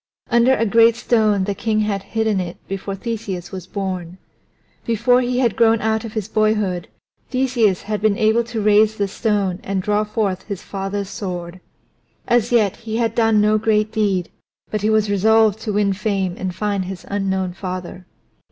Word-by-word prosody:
Under 240 Hz, +2 st, +4 dB
a 230 Hz, -, 0 dB
great 230 Hz, +1 st, +5 dB
stone 215 Hz, -4 st, +2 dB
the 200 Hz, +1 st, -1 dB
king 215 Hz, +1 st, 0 dB
had 205 Hz, -2 st, -1 dB, 0.2 s
hidden 220 Hz, -3 st, +2 dB
it 175 Hz, -1 st, -5 dB
before 195 Hz, 0 st, -4 dB
Theseus 200 Hz, -5 st, -5 dB
was 185 Hz, -2 st, -7 dB
born. 185 Hz, -3 st, -4 dB, 0.7 s
Before 235 Hz, +2 st, +2 dB
he 250 Hz, 0 st, -1 dB
had 240 Hz, -5 st, +2 dB
grown 225 Hz, -1 st, +4 dB
out 220 Hz, +1 st, 0 dB
of 225 Hz, -2 st, -7 dB
his 215 Hz, -3 st, -3 dB
boyhood 215 Hz, -5 st, 0 dB, 0.4 s
Theseus 245 Hz, -7 st, +1 dB
had 210 Hz, 0 st, -3 dB
been 210 Hz, -1 st, +2 dB
able 220 Hz, +2 st, +3 dB
to 235 Hz, -2 st, -4 dB
raise 215 Hz, +1 st, +4 dB
the 200 Hz, -, 0 dB
stone 200 Hz, -3 st, -1 dB
and 195 Hz, 0 st, -2 dB
draw 210 Hz, +2 st, +1 dB
forth 210 Hz, -3 st, -2 dB
his 200 Hz, -4 st, -5 dB
father's 195 Hz, 0 st, -4 dB
sword. 180 Hz, -4 st, -5 dB, 0.7 s
As 240 Hz, -1 st, +2 dB
yet 215 Hz, -5 st, +2 dB
he 225 Hz, -1 st, -4 dB
had 230 Hz, -2 st, 0 dB
done 225 Hz, -2 st, +3 dB
no 215 Hz, +1 st, +3 dB
great 215 Hz, 0 st, +1 dB
deed, 200 Hz, -5 st, 0 dB, 0.4 s
but 215 Hz, -, -1 dB
he 210 Hz, -, +1 dB
was 215 Hz, -1 st, +2 dB
resolved 220 Hz, +1 st, +3 dB
to 215 Hz, -1 st, -3 dB
win 200 Hz, -1 st, +2 dB
fame 195 Hz, -3 st, -1 dB
and 185 Hz, -, -3 dB
to 180 Hz, -, -9 dB
find 200 Hz, -2 st, -1 dB
his 190 Hz, 0 st, -7 dB
unknown 190 Hz, -2 st, -1 dB
father. 185 Hz, -1 st, -6 dB
210 Hz, 180 wpm, -20 LUFS, 195-220 Hz, 0.7 s, great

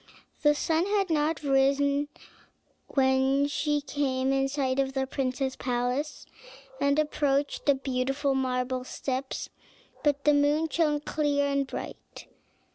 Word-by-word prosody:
The 295 Hz, 0 st, +4 dB
sun 325 Hz, +4 st, +1 dB
had 400 Hz, -3 st, +1 dB
not 310 Hz, 0 st, 0 dB
risen 280 Hz, +1 st, +2 dB, 0.8 s
when 265 Hz, +1 st, +2 dB
she 295 Hz, 0 st, 0 dB
came 270 Hz, -2 st, 0 dB
in 270 Hz, 0 st, +2 dB
sight 270 Hz, -1 st, -1 dB
of 270 Hz, 0 st, 0 dB
the 265 Hz, 0 st, 0 dB
prince's 265 Hz, 0 st, -2 dB
palace, 250 Hz, +4 st, -2 dB, 0.5 s
and 280 Hz, +1 st, +2 dB
approached 290 Hz, -2 st, 0 dB
the 285 Hz, -, +5 dB
beautiful 270 Hz, +1 st, -1 dB
marble 255 Hz, -1 st, -1 dB
steps, 265 Hz, +1 st, -4 dB, 0.5 s
but 285 Hz, -2 st, +1 dB
the 295 Hz, -, +5 dB
moon 295 Hz, +2 st, +2 dB
shone 300 Hz, -2 st, +1 dB
clear 290 Hz, -1 st, 0 dB
and 280 Hz, -1 st, 0 dB
bright. -, -, -8 dB
280 Hz, 125 wpm, -28 LUFS, 265-295 Hz, 0.8 s, the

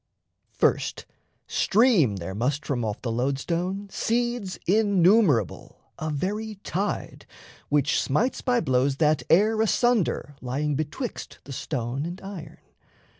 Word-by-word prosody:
First, -, -, 0 dB, 0.4 s
stream 200 Hz, -, +3 dB
there 95 Hz, 0 st, -5 dB
must 130 Hz, +8 st, -1 dB
from 125 Hz, -4 st, -1 dB
off 105 Hz, -1 st, -4 dB
the 120 Hz, -, -1 dB
lode 130 Hz, +4 st, 0 dB
stone 180 Hz, +7 st, -2 dB
seeds 240 Hz, -4 st, -1 dB
Innumerable, 190 Hz, -, +3 dB, 0.2 s
a 155 Hz, -, -2 dB
very 210 Hz, +8 st, -3 dB
tide, 200 Hz, +3 st, -3 dB, 0.4 s
which 145 Hz, 0 st, +2 dB
smites 215 Hz, -, 0 dB
By 245 Hz, -2 st, +1 dB
blows 130 Hz, -1 st, +1 dB
that 150 Hz, 0 st, +2 dB
air 215 Hz, +5 st, +4 dB
asunder 220 Hz, -, +1 dB
lying 140 Hz, +4 st, -1 dB
betwixt 155 Hz, -, -4 dB
The 135 Hz, -, -8 dB
stone 130 Hz, +2 st, -3 dB
and 175 Hz, +2 st, -7 dB
iron. 195 Hz, -5 st, -8 dB
165 Hz, 125 wpm, -25 LUFS, 135-210 Hz, 0.4 s, air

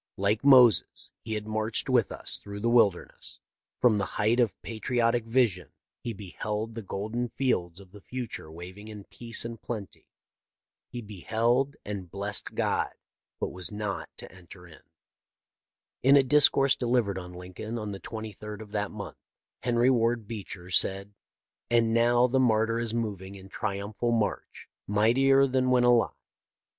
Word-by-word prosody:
Like 100 Hz, +4 st, +1 dB
Moses, 125 Hz, -5 st, +5 dB
he 110 Hz, -1 st, -4 dB
had 105 Hz, 0 st, -4 dB
marched 110 Hz, 0 st, 0 dB
with 125 Hz, -5 st, +2 dB
us -, -, 0 dB
through 100 Hz, 0 st, -8 dB
the 115 Hz, +2 st, +1 dB
wilderness. 100 Hz, -7 st, +1 dB, 0.4 s
From 110 Hz, -4 st, +4 dB
the 100 Hz, -, 0 dB
height 115 Hz, +3 st, +2 dB
of 120 Hz, -4 st, +1 dB
patriotic 115 Hz, +1 st, 0 dB
vision 110 Hz, -, +1 dB, 0.3 s
he 120 Hz, -, -4 dB
beheld 105 Hz, +2 st, -4 dB
the 115 Hz, -, -6 dB
golden 110 Hz, +5 st, -3 dB
fields 90 Hz, -11 st, -1 dB
of 95 Hz, -2 st, -15 dB
the 105 Hz, 0 st, -13 dB
future 120 Hz, -11 st, -6 dB
waving 90 Hz, +5 st, -10 dB
in 105 Hz, -2 st, -9 dB
peace 115 Hz, +3 st, -6 dB
and 115 Hz, -1 st, -7 dB
plenty. 110 Hz, -5 st, -7 dB, 0.8 s
He 120 Hz, -1 st, -7 dB
beheld, 115 Hz, -, 0 dB
and 100 Hz, -4 st, -5 dB
blessed 100 Hz, +3 st, -3 dB
God, -, -, 0 dB, 0.4 s
but -, -, -2 dB
was 90 Hz, +1 st, -3 dB
not 105 Hz, -1 st, -4 dB
to -, -, -9 dB
enter 90 Hz, -1 st, -13 dB
in." 85 Hz, -3 st, -15 dB, 1.2 s
In 135 Hz, +2 st, +6 dB
a 140 Hz, -, +6 dB
discourse 135 Hz, 0 st, +5 dB
delivered 120 Hz, -7 st, 0 dB
on 90 Hz, -1 st, -9 dB
Lincoln 90 Hz, +6 st, -7 dB
on 105 Hz, -2 st, -4 dB
the 100 Hz, -, -6 dB
23d 105 Hz, -1 st, -7 dB
of 110 Hz, -2 st, -11 dB
that 105 Hz, -1 st, -1 dB
month, 100 Hz, -3 st, -8 dB, 0.4 s
Henry 120 Hz, +1 st, +3 dB
Ward 115 Hz, -2 st, +1 dB
Beecher 95 Hz, -5 st, -6 dB
said: 100 Hz, +3 st, +2 dB, 0.6 s
"And 115 Hz, -1 st, +3 dB
now 120 Hz, +1 st, +4 dB
the 130 Hz, +1 st, +1 dB
martyr 115 Hz, -2 st, +2 dB
is 115 Hz, -2 st, -2 dB
moving 100 Hz, -4 st, -4 dB
in 95 Hz, 0 st, -12 dB
triumphal 105 Hz, +4 st, -3 dB
march, 110 Hz, -3 st, -2 dB, 0.2 s
mightier 130 Hz, +7 st, +4 dB
than 130 Hz, -1 st, +1 dB
when 125 Hz, -1 st, +4 dB
alive. 120 Hz, -1 st, +3 dB
110 Hz, 155 wpm, -28 LUFS, 100-120 Hz, 1.2 s, In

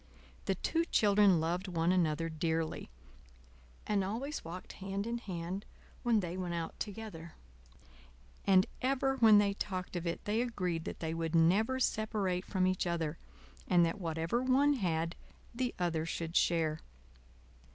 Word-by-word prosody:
The -, -, +1 dB
two 330 Hz, 0 st, 0 dB
children 205 Hz, -, +4 dB
loved 175 Hz, +4 st, -1 dB
one 170 Hz, -1 st, +1 dB
another 165 Hz, -3 st, +1 dB
dearly, 160 Hz, 0 st, -2 dB, 1.0 s
and 205 Hz, -2 st, +1 dB
always 245 Hz, +10 st, -3 dB
walked 175 Hz, +3 st, -8 dB
hand 195 Hz, +1 st, -3 dB
in 235 Hz, +1 st, -2 dB
hand 185 Hz, -1 st, -5 dB, 0.4 s
when 230 Hz, -3 st, +3 dB
they 175 Hz, -1 st, -4 dB
went 180 Hz, -2 st, -3 dB
out 165 Hz, -1 st, -4 dB
together; 200 Hz, -6 st, -7 dB, 1.1 s
and 190 Hz, -1 st, +6 dB, 0.2 s
ever 270 Hz, +1 st, +1 dB
when 220 Hz, -4 st, +7 dB
they 205 Hz, -1 st, +3 dB
talked 185 Hz, -2 st, -4 dB
of 175 Hz, 0 st, -2 dB
it 170 Hz, -, -3 dB
they 215 Hz, +3 st, +1 dB
agreed 180 Hz, -9 st, -2 dB
that -, -, -6 dB
they 160 Hz, -1 st, -2 dB
would 165 Hz, 0 st, -2 dB
never 200 Hz, +10 st, +3 dB
separate 205 Hz, -6 st, 0 dB
from 185 Hz, -1 st, +1 dB
each 185 Hz, -1 st, +1 dB
other, 165 Hz, -2 st, -2 dB, 0.5 s
and 175 Hz, -2 st, +5 dB
that 165 Hz, +4 st, -3 dB
whatever 165 Hz, +7 st, -1 dB
one 270 Hz, +3 st, +4 dB
had 170 Hz, -, -1 dB, 0.4 s
the 245 Hz, +1 st, -1 dB
other 165 Hz, -3 st, -1 dB
should 165 Hz, 0 st, -4 dB
share. 160 Hz, -2 st, +2 dB
185 Hz, 150 wpm, -33 LUFS, 165-215 Hz, 1.1 s, when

